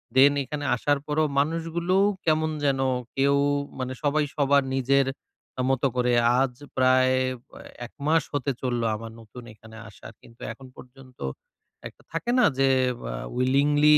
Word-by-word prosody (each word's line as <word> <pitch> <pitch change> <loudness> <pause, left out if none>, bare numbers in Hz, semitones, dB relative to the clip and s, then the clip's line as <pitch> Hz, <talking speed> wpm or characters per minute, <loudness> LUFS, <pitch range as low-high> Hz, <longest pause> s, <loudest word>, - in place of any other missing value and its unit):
দেন 140 +2 +7
এখানে 145 +1 -5
আসার 145 +3 0
পরও 155 +1 +1
মানুষগুলো 165 +4 -1 0.3
কেমন 155 0 +2 0.2
যেন 135 -1 +1 0.4
কেউ 140 +1 +3 0.4
মানে 130 0 -3
সবাই 150 +1 +2
সবার 140 -1 +3
নিজের 135 +1 +2 0.6
মত 135 0 0
করে 125 -1 +1 0.3
আজ 135 -2 +1 0.2
প্রায় 130 0 +4 0.4
আ - - -12 0.3
১ - - -30
মাস 160 0 +3
হতে 140 -1 -1
চলল 120 -2 -1
আমার 115 +1 -8
নতুন 115 +3 -12
এখানে 110 +1 -15
আসার। 100 - -13
কিন্তু 115 - -19
এখন 135 -1 -14
পর্যন্ত 130 0 -15 0.7
একটা - - -17
থাকে 165 +9 -2
না - - +6
যে 135 0 +4 0.4
আ - - -4 0.2
উইলিংলি 145 +4 +4
135 Hz, 145 wpm, -25 LUFS, 130-150 Hz, 0.7 s, দেন